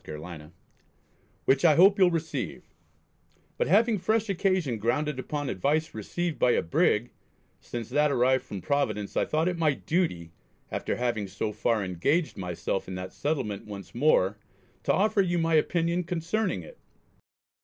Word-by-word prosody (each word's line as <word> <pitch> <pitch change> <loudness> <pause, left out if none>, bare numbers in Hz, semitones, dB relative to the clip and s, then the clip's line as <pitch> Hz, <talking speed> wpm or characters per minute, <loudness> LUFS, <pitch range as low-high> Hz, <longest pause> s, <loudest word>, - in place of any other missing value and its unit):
Carolina) 75 0 -9 0.9
which 135 0 +3
I 160 -3 +6
hope 195 +5 +6
you'll 185 -2 +6
receive, 165 -2 -4 0.8
but - - 0
having 225 -2 +3
fresh 215 +3 0
occasion 185 - 0
grounded 140 +6 0
upon 145 +2 -3
advice 150 - 0
received 165 - -3
by 120 - +4
a - - +1
Brig; 85 - +1 0.5
since 120 -2 -6
that 150 0 +2
arrived 130 0 +2
from 100 -7 -7
Providence 110 -7 -1
I - - +2
thought 155 +2 0
it 180 -2 -1
my 155 -4 +2
duty, 140 - -1 0.4
after - - -2
having 120 -4 -1
so 100 +3 -3
far 110 -1 0
engaged 140 - 0
myself 90 +1 -3
in 95 - -5
that 90 0 -6
settlement 120 -10 -3
once 100 -3 -9
more 105 -7 +2 0.5
to - - +3
offer 205 +1 +3
you 175 -2 0
my 165 -1 +1
opinion 170 +2 +2
concerning 170 - -2
it. - - -14
145 Hz, 155 wpm, -27 LUFS, 105-170 Hz, 0.9 s, I